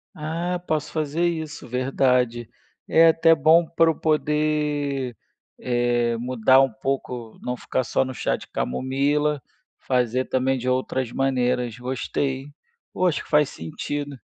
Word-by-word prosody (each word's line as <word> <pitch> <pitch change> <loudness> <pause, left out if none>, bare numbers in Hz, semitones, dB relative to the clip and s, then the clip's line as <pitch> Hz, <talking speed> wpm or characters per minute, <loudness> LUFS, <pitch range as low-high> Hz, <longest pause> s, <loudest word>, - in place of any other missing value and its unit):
Ah, 170 +4 -3
posso 155 -2 -1
fazer 155 +2 -1
isso, 160 -3 -4
verdade. 125 -2 +1 0.4
É 165 +1 +6
até 165 0 +5
bom 160 +3 +5
pra 165 0 +3
eu - - -6
poder, 150 -4 0 0.4
eh, 120 -1 +1
mudar 125 +2 +4
um 135 -3 +1
pouco, 125 -2 -4
não 125 - -3
ficar 130 - -2
só 125 - +1
no 130 0 -5
chá - - -1
de - - -11
camomila, 140 - 0 0.4
fazer 125 0 0
também 130 +1 0
de 125 0 -5
outras 130 -1 -1
maneiras, 125 -3 0
gostei. 130 +2 -3 0.4
Oh, 185 - -1
acho 175 -4 +1
que - - -18
faz 150 -2 +4
sentido. 140 - -5
135 Hz, 140 wpm, -23 LUFS, 125-150 Hz, 0.4 s, É